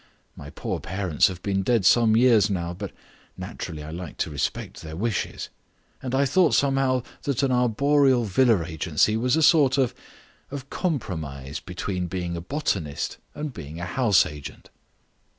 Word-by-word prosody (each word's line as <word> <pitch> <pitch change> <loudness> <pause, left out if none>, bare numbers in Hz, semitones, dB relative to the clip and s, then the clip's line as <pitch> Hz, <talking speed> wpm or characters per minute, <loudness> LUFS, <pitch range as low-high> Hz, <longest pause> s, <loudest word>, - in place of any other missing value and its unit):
My - - -10
poor - - -4
parents 95 -3 +1
have 90 -1 -7
been 95 -1 0
dead 115 -1 +1
some 110 +2 +5
years 115 -4 +5
now, 85 -3 -2
but 90 - -6 0.5
naturally 75 -2 -6
I 75 - -8
like 85 -1 -7
to - - -9
respect 70 -3 -3
their 80 0 -8
wishes. 110 +3 -2 0.5
And 130 0 -3
I 140 +1 +3
thought 165 +6 +3
somehow 135 -2 +2 0.2
that 140 -2 -1
an 135 - +2
arboreal 130 +2 +3
villa 110 -3 +3
agency 80 +4 +1
was 125 +4 +2
a 160 - +2
sort 145 -4 +5
of 130 -4 +2 0.6
of 140 -1 -8
compromise 80 - -3
between 90 0 -4
being 85 -1 -3
a 85 - -4
botanist 95 - -2 0.2
and 150 -2 -5
being 80 -5 -8
a 90 - -3
house 105 +2 +3
agent." 75 -2 -9
105 Hz, 160 wpm, -25 LUFS, 85-130 Hz, 0.6 s, some